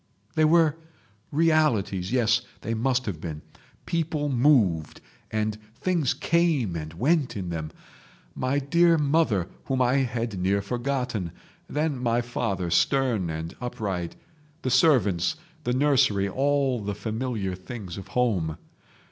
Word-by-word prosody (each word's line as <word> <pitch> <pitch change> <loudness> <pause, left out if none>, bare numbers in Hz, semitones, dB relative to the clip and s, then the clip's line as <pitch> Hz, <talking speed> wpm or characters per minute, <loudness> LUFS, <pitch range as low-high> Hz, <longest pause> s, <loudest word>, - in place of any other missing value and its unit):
"They 155 -1 +3
were 160 -1 +4 0.5
realities—yes, 120 - +2 0.2
they 115 - -2
must 125 +3 +1
have 85 -7 -4
been; 80 -3 -6 0.4
people 160 -3 -1
moved 120 - +3 0.3
and 110 0 -1 0.2
things 170 -5 0
came 160 - +1
and 80 -1 -5
went 140 - +1
in 90 -3 -4
them; 80 -2 -4 0.6
my 130 +2 -1
dear 170 +4 +4
mother, 140 - +2 0.2
whom 135 -1 -1
I 125 +1 +3
had 120 -6 -1
near 95 +2 +2
forgotten; 125 -5 -2 0.4
then 150 -3 -1
my 120 -1 +2
father, 95 -7 -2
stern 120 -4 +2
and 80 +1 -5
upright, 100 -8 -3 0.5
the 130 - 0
servants, 125 - +3 0.3
the 125 - +1
nursery, 130 -7 +3
all 135 +2 +1
the 105 -1 -4
familiar 110 -3 -3
things 95 0 -7
of 95 - -10
home. 95 -11 +1
120 Hz, 125 wpm, -26 LUFS, 95-140 Hz, 0.6 s, were